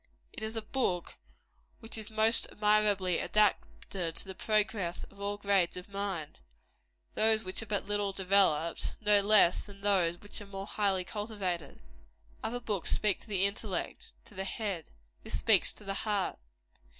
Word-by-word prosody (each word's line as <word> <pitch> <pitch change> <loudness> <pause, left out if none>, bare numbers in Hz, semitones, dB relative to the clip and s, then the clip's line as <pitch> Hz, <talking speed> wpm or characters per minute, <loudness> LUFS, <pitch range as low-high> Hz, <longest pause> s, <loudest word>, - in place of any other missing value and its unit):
It - - -8
is 220 +1 -4
a 225 - -2
book 210 -7 -2 0.6
which 225 - -4
is 220 -1 -4
most 220 +1 +4
admirably 210 -4 +2
adapted 195 -4 0
to - - -1
the 190 - -5
progress 205 -4 -1
of 200 0 -13
all 205 0 -2
grades 200 -4 +1
of 180 +2 -8
mind 195 -6 -4 0.7
those 220 0 +3
which 185 +3 -3
are 225 - -8
but 205 -1 -1
little 205 -1 0
developed, 185 -4 +2
no 210 -1 +4
less 200 -4 +6
than 200 -1 -14
those 185 -4 +2
which 205 +1 -8
are 205 - -10
more 195 0 -6
highly 200 -3 +1
cultivated. 190 -7 -4 0.6
Other 245 +2 -2
books 210 -7 -3
speak 210 -3 +1
to - - -16
the 195 -2 +2
intellect 200 -2 -3
to - - -15
the 190 -1 -3
head; 195 -4 -3 0.3
this - - -5
speaks - - +3
to - - -15
the 195 -1 -3
heart. 205 -2 -1
200 Hz, 160 wpm, -31 LUFS, 185-215 Hz, 0.7 s, less